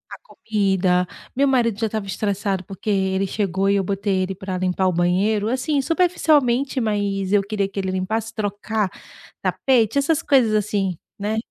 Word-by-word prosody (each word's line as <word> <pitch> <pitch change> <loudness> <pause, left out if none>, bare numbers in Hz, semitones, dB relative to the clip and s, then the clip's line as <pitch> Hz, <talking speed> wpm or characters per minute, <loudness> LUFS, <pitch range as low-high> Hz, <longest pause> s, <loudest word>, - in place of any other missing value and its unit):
a - - -17
comida, 190 - 0 0.3
meu 280 +1 +3
marido 230 -5 +2
já 225 - +1
estava 215 -1 -3
estressado, 195 0 -2
porque 195 +2 -11
ele 190 -1 +1
chegou 195 -1 -1
e 200 - +3
eu 195 - +1
botei 195 0 -1
ele 190 +1 -2
pra 190 -1 -4
limpar 185 0 0
o 180 - +1
banheiro, 195 +5 +1
assim, 275 +3 0
superficialmente, 285 -6 +2
mas 205 -3 -1
eu 205 - +5
queria 200 -1 -2
que 195 - -6
ele 190 -1 -2
limpasse, 215 +4 -2
trocar 210 -1 -2 0.5
tapete, 245 -2 +2
essas 310 +3 +2
coisas, 255 -8 +3
assim, 200 -3 0 0.2
né. 210 +2 -2
205 Hz, 165 wpm, -22 LUFS, 190-225 Hz, 0.5 s, eu